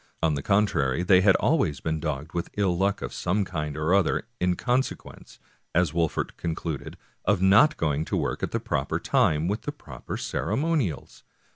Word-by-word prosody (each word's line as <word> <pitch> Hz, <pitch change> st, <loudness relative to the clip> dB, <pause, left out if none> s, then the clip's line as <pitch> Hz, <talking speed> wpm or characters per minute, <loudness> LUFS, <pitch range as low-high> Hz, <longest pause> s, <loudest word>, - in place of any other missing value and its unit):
On 80 Hz, -2 st, +3 dB
the 70 Hz, -, -2 dB
contrary, 90 Hz, -7 st, +1 dB
they 90 Hz, 0 st, +5 dB
had 95 Hz, 0 st, +5 dB
always 100 Hz, -, +1 dB
been 80 Hz, -1 st, -2 dB
dogged 75 Hz, -1 st, -4 dB
with 85 Hz, -1 st, -3 dB
ill 95 Hz, -4 st, +2 dB
luck 95 Hz, +3 st, 0 dB
of -, -, -5 dB
some 100 Hz, +3 st, 0 dB
kind 75 Hz, -5 st, -4 dB
or 80 Hz, +3 st, +1 dB
other, 100 Hz, +1 st, +2 dB
in 90 Hz, 0 st, +1 dB
consequence, 125 Hz, +6 st, -3 dB, 0.4 s
as 85 Hz, -3 st, +2 dB
Wolfert 80 Hz, -2 st, -1 dB
concluded, 80 Hz, -3 st, -4 dB, 0.3 s
of 105 Hz, -1 st, +2 dB
not 100 Hz, +12 st, +5 dB
going 75 Hz, -1 st, 0 dB
to -, -, -2 dB
work -, -, -2 dB
at -, -, -1 dB
the -, -, -2 dB
proper 70 Hz, 0 st, -2 dB
time 75 Hz, -1 st, +2 dB
and 85 Hz, -, -1 dB
with 105 Hz, -, -3 dB
the 145 Hz, -, -4 dB
proper 75 Hz, -, -8 dB
ceremonials. 150 Hz, -, -2 dB
85 Hz, 180 wpm, -26 LUFS, 75-100 Hz, 0.4 s, they